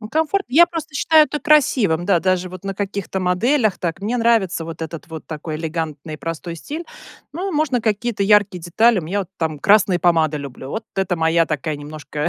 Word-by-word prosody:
Ну 215 - -8
комфорт 320 - 0
я 330 +7 +6
просто 325 -3 -6
считаю 310 +2 +5
это 295 - -4
красивым, 250 - +3
да, 180 -2 +3
даже 185 0 0
вот 185 0 -10
на 195 - -2
каких-то 200 -1 -3
моделях 205 +5 +1
так, 170 -1 -3
мне 220 +5 -1
нравится 225 -8 +2
вот 165 0 -8
этот 160 0 -7
вот 160 -1 -8
такой 155 0 -5
элегантный 160 -1 -4
и - - -7
простой 165 +2 -5
стиль, 305 - -7 0.5
ну 365 +6 -3
можно 295 -5 +1
какие-то 220 -1 -1
яркие 200 -3 +3
детали. 220 +5 +3
У - - -10
меня 185 +6 -2
вот 190 - -6
там 160 -2 -2
красные 195 +1 +4
помады 160 -4 +2
люблю, 135 -1 -8
вот 220 +5 -4
это 190 -2 -1
моя 165 0 +2
такая 150 0 -2
немножко 150 +1 -5
185 Hz, 200 wpm, -20 LUFS, 160-235 Hz, 0.5 s, я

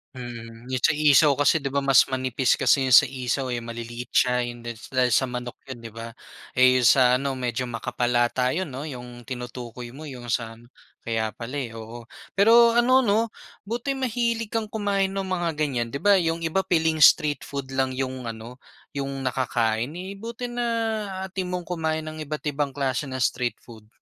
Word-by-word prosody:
Hmm, 120 -1 -9
yung 130 -1 -3
sa - - +5
isaw 150 0 +5
kasi 145 +1 +3
'di 135 - -2
ba 140 - +1
mas 135 -1 +5
manipis 130 -1 +1
kasi 130 +1 +4
yun 130 - 0
sa - - +8
isaw, 130 0 -2
eh, 120 -2 -3
maliliit 120 +1 -7
siya 125 0 +3
yun 120 0 -6
din 120 0 -6 0.2
dahil 130 -1 +3
sa 125 - +3
manok 125 -1 -5 0.2
yun 120 - -7
'di 115 - -8
ba? 115 0 -7 0.4
Eh, 130 0 +4
sa 125 +1 +6
ano 135 +1 -1
medyo 125 -1 -2
makapal 120 0 -2
ata 125 +1 +1
yun 185 +2 -2
'no 135 +1 -6
yung 125 -4 -8
tinutukoy 125 -1 -7
mo 155 - -9
yung 125 -5 -8
sa 115 -1 -2 0.5
kaya 110 -1 -1
pala, 120 +4 -7
eh, 125 -5 -4
oo. 115 +2 -9 0.3
Pero 230 +3 +6
ano 255 +2 +5
'no 225 -2 +1 0.3
buti 240 +6 -3
mahilig 235 -3 -1
kang 225 -2 -1
kumain 200 -2 -1
ng 195 - -1
mga 185 -2 -1
ganyan 135 -6 -1
'di 140 - -6
ba 200 -2 +6
yung 165 0 -1
iba 165 +4 +1
piling 160 -4 +1
street 150 -1 +5
food 140 -1 -5
lang 130 -1 0
yung 130 -2 -4
ano, 115 +3 -8 0.3
yung 135 -1 -4
nakakain, 120 +1 -1
eh, 185 +2 -6
buti 235 +2 -6
naaatim 215 -6 -2
mong 180 - -4
kumain 160 -2 -1
ng 155 0 -7
iba't 150 0 -5
ibang 140 -1 -2
klase 135 0 -1
ng 130 - -6
street 120 0 0
food? 110 -3 -14
135 Hz, 185 wpm, -25 LUFS, 120-180 Hz, 0.5 s, sa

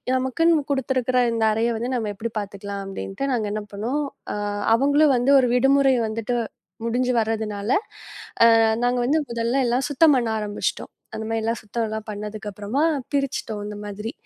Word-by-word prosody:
நமக்குன்னு 295 +5 +2
குடுத்திருக்கிற 255 -1 +1
இந்த 225 -1 0
அறையை 230 +2 +1
வந்து 245 +3 -3
நம்ம 220 -4 -1
எப்படி 225 +4 -4
பாத்துக்கலாம் 200 0 -6
அப்படின்னுட்டு 195 +5 -5
நாங்க 220 -3 0
என்ன 215 - -3
பண்ணோம். 245 +9 -2 0.3
அ - - -3 0.4
அவங்க 285 +5 +4
வந்து 250 +3 +2
ஒரு 250 -2 +2
விடுமுறை 270 +1 +4
வந்துட்டு 225 +2 -2 0.5
முடிஞ்சு 250 +2 +1
வர்றதுனால 215 -2 -2 0.9
அ - - +4 0.2
நாங்க 245 0 +2
வந்து 300 +5 +2
முதல்லல்லாம் 240 +2 0
சுத்தம் 295 +2 +5
பண்ண 240 -2 +1
ஆரம்பிச்சிட்டோம். 205 -1 -3 0.3
அந்த 220 - -4
மாரில்லாம் 225 +1 -1
சுத்தம் 225 +2 -3
எல்லாம் 220 0 -5
பண்ணதுக்கு 210 0 -6
அப்புறமா 210 +9 -2 0.3
பிரிச்சிட்டோம் 270 -6 -2
அந்த 210 - -6
மாதிரி. 210 +3 -5
230 Hz, 150 wpm, -23 LUFS, 215-260 Hz, 0.9 s, சுத்தம்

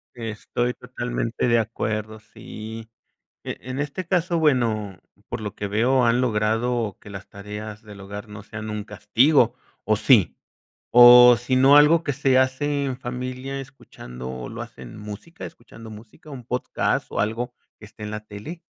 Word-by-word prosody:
Estoy 120 +1 -3
totalmente 120 -1 -3
de 115 0 +4
acuerdo, 110 -1 -3
sí. 110 +1 -10 0.5
E - - -5
en 130 +3 -6
este 150 +5 -4
caso, 175 -1 0
bueno, 115 - +1 0.3
por - - -4
lo 105 -2 -6
que 105 - -4
veo, 120 +5 +2
han 115 +2 +3
logrado 115 -1 0
que - - -13
las 95 -2 -9
tareas 105 +2 -8
del 105 -2 -12
hogar 105 +2 -8
no 105 -1 -10
sean 110 0 -7
un 105 -1 -4
castigo, 110 +6 +2 0.3
¿o - - +3
sí? - - +4 0.6
O 125 0 +9
si 120 +2 -1
no, 135 +3 +6
algo 155 +3 +6
que 145 - -1
se 135 -1 +2
hace 140 +2 0
en 130 -2 -3
familia 130 +2 -5
escuchando 65 - -9
¿lo - - -8
hacen 60 -2 -11
música, 105 - -9
escuchando 115 -1 -13
música, 110 +7 -14
un 130 -3 -9
podcast 125 +1 -1
o - - -2
algo 115 +4 -2 0.3
que 105 - -12
esté 105 +1 -14
en 105 - -5
la 105 0 -5
tele? 105 +12 -9
115 Hz, 165 wpm, -23 LUFS, 105-130 Hz, 0.6 s, O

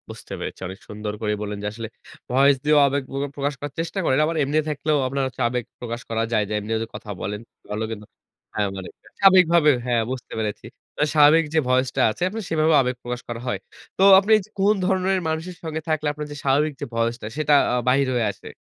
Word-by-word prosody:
বুঝতে - - -9
পেরেছি। - - -6
অনেক 95 +2 -9
সুন্দর 105 0 -5
করেই 105 -1 -1
বললেন 105 0 -4
যে - - -1
আসলে 115 +1 -6 0.4
ভয়েস 135 +2 +5
দিয়েও 150 0 +4
আবেগ 140 0 -1
প্র - - -6 0.2
প্রকাশ 145 +1 -1
করার 145 -1 -6
চেষ্টা 170 +4 -3
করেন। 130 -3 +2
আবার 165 +2 -2
এমনি 145 +3 0
থাকলেও 150 +1 0
আপনার 135 +1 -1 0.2
আবেগ 125 0 -2 0.2
প্রকাশ 120 0 -5
করা 115 0 0
যায়। 105 - +3
যে - - -3
এমনিও 110 +2 -2
যে - - -6
কথা 105 - -9
বলেন। 105 +1 -4 0.3
ভালো 105 +1 -2
কিন্তু 105 -1 -7 0.5
হ্যাঁ 105 -1 0
মানে 95 -1 -7 0.3
স্বাবিকভাবে 175 -5 +6 0.2
হ্যাঁ 120 -2 +2
বুঝতে 130 -2 -6
পেরেছি। 105 -2 -3 0.4
আ - - +5
স্বাভাবিক 155 +2 +6
যে 160 - +4
voice 130 0 +2
টা 135 - +2
আছে 140 - -5
আপনি 220 +3 -5
সেভাবেও 160 0 +3
আবেগ 125 -1 -1
প্রকাশ 120 0 -4
করা 120 -1 -5
হয়। - - -1 0.4
তো 190 - +3 0.2
আপনি 200 +3 -2
এই - - -2
যে - - -25
কোন 200 +2 +4
ধরনের 190 0 +1
মানুষের 160 +3 -4
সঙ্গে 160 -1 -4
থাকলে 155 -1 0
আপনার 150 0 -6
যে 145 - -7
স্বাভাবিক 145 +3 +2
যে - - -2
voice 115 +1 0
টা - - -5
সেটা 150 -1 +2 0.2
আ - - +2
বাহির 135 +2 +3
হয়ে 120 -2 +1
আসে? - - -15
135 Hz, 220 wpm, -23 LUFS, 115-155 Hz, 0.5 s, স্বাবিকভাবে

